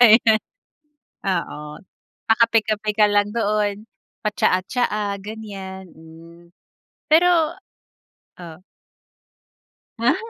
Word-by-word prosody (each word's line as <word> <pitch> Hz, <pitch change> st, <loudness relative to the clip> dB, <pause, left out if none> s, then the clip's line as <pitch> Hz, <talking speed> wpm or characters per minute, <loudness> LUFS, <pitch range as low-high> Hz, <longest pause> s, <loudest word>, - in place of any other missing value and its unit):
Ayun, 220 Hz, -2 st, +6 dB, 0.8 s
oo, 180 Hz, -5 st, -2 dB, 0.7 s
pa-kape-kape 220 Hz, -2 st, +2 dB
ka 210 Hz, -1 st, +6 dB
lang 205 Hz, 0 st, +1 dB
doon, 210 Hz, -1 st, -1 dB, 0.4 s
pa-tsaa-tsaa, 205 Hz, +1 st, 0 dB
ganyan, 195 Hz, -3 st, -8 dB
hmm. 165 Hz, +2 st, -16 dB, 0.6 s
Pero 335 Hz, 0 st, +4 dB, 0.9 s
oh. 165 Hz, -2 st, -10 dB, 1.4 s
Ah. 245 Hz, +8 st, +3 dB
210 Hz, 70 wpm, -21 LUFS, 190-225 Hz, 1.4 s, Ayun